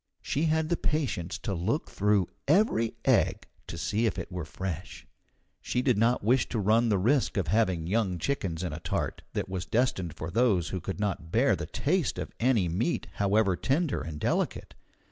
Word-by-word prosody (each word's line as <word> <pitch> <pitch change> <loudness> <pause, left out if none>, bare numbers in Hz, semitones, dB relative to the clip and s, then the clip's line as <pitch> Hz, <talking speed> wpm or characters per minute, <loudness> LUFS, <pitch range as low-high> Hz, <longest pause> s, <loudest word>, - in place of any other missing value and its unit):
She 150 +4 0
had 160 0 +1
the 170 - +1
patience 130 - -1
to 105 - -4
look 100 - -1
through 100 -2 +2 0.2
every 150 - +3
egg - - +2 0.2
to 85 - -6
see 110 +6 0
if 100 - -2
it 85 +1 -5
were 90 -3 -4
fresh. 90 +1 -6 0.6
She 125 - -1
did 125 -3 +3
not 115 +3 +2
wish 125 +4 +2
to - - -2
run 110 +3 +3
the 105 - +3
risk 120 +4 +2
of 90 -6 0
having 95 -5 +2
young 95 -1 0
chickens 90 - -2
in 85 - -3
a 75 - -5
tart - - -2
that - - -2
was 95 -2 -4
destined 95 -9 0
for 80 +1 -5
those 105 -5 +2
who 95 - -3
could 95 +4 -5
not 95 -5 -2
bear 120 +7 +3
the - - -5
taste 160 0 0
of - - -5
any 115 -6 +3
meat 100 - -1
however 100 -1 +3
tender 145 - 0
and 75 0 -6
delicate. - - -1
105 Hz, 190 wpm, -28 LUFS, 90-125 Hz, 0.6 s, every